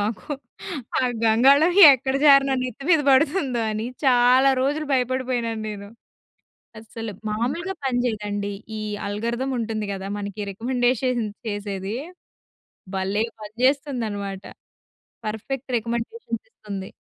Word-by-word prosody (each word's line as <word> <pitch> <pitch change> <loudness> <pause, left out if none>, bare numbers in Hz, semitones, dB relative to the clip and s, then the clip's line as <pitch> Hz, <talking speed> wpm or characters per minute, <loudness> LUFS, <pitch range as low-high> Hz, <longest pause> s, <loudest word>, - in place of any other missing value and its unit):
మాకు. 205 -2 -3 0.7
ఆ - - 0 0.2
గంగాళం 270 +9 +5 0.2
ఎక్కడ 265 0 -1
జారి 275 -1 +8
నా 270 - +2
నెత్తి 255 +2 -6
మీద 325 -3 +6
పడుతుందో 275 -3 +2
అని 215 +2 -3 0.2
చాలా 255 +1 +5
రోజులు 295 +3 0
భయపడిపోయినాను 250 -3 0
నేను. 200 -1 -7 0.9
అస్సలు 225 0 -7 0.2
మామూలుగా 265 - -2
పనిచేయదండి. 210 -5 -1 0.3
ఈ - - -4 0.3
ఆల్గారిథమ్ 235 +6 -2
ఉంటుంది 220 -2 -3
గదా 195 0 -6
మనకి 200 0 -5
రికమెండేషన్ 245 +2 0 0.2
చేసేది 205 0 -4 1.0
భలే 195 +3 0 0.2
పనిచేస్తుందన్నమాట. 220 -4 -1 0.8
పర్ఫెక్ట్ 240 +5 -4
రికమెండేషన్స్ 235 - -4
ఇస్తుంది. 200 - -7
235 Hz, 100 wpm, -23 LUFS, 210-265 Hz, 1.0 s, జారి